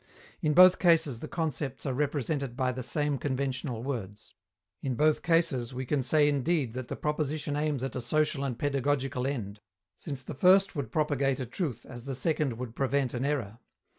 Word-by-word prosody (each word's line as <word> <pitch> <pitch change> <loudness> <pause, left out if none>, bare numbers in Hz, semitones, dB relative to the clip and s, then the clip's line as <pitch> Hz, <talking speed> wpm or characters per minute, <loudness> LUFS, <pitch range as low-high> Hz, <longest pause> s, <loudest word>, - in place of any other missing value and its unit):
In 150 -1 +1
both 185 0 +8
cases 160 -8 +3
the - - -6
concepts 155 -4 -3
are 135 - -1
represented 140 -2 -1
by 130 -1 +1
the 130 +1 -5
same 145 +3 -1
conventional 130 -3 -2
words. 110 -6 -6 0.5
In 130 -2 -2
both 155 +3 +3
cases 160 -8 +1
we 130 +1 -3
can 140 +2 0
say 145 +4 +4
indeed 145 -3 +1
that 130 -1 -5
the - - -4
proposition 150 0 -2
aims 150 -3 -1
at 135 - -3
a 130 - -2
social 150 +3 0
and 130 -4 -2
pedagogical 135 -2 0
end, 105 -7 -4 0.4
since 140 -4 -6
the - - -6
first 190 +6 +4
would 135 -7 -4
propagate 140 -3 +1
a 130 - -2
truth 125 - -4
as 120 -1 -9
the 135 -1 -3
second 150 0 0
would 120 -2 -6
prevent 135 -1 0
an 125 +1 -2
error. 120 -7 -2
140 Hz, 185 wpm, -29 LUFS, 125-150 Hz, 0.5 s, both